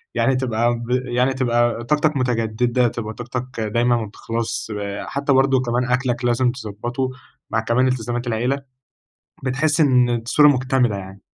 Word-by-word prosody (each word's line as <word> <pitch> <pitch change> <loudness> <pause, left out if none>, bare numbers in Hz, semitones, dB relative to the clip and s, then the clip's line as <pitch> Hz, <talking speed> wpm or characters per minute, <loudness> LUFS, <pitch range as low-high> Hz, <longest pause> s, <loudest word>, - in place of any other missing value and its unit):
يعني 135 - +2
تبقى 120 -2 +1
ب 120 +1 -7
يعني 125 +1 +1
تبقى 120 -2 +1
طاقتك 150 +2 +1
متجددة، 120 0 +1
تبقى 110 -1 -4
طاقتك 125 +1 -6
دايمًا 120 +3 +2
ما 110 - -3
بتخلصش، 115 +1 -4 0.3
حتى 140 0 0
برضه 135 -1 +3
كمان 120 0 0
أكلك 125 -1 0
لازم 120 +1 +2
تضبّطه، 120 +2 -4 0.4
مع 110 - +1
كمان 115 +3 +2
إلتزامات 120 0 -2
العيلة، 120 +4 0 0.9
بتحس 145 +4 +1
إن 125 -4 +4
الصورة 120 +6 +4
مكتملة 125 -5 +2
يعني. 95 +1 -9
120 Hz, 145 wpm, -21 LUFS, 115-130 Hz, 0.9 s, إن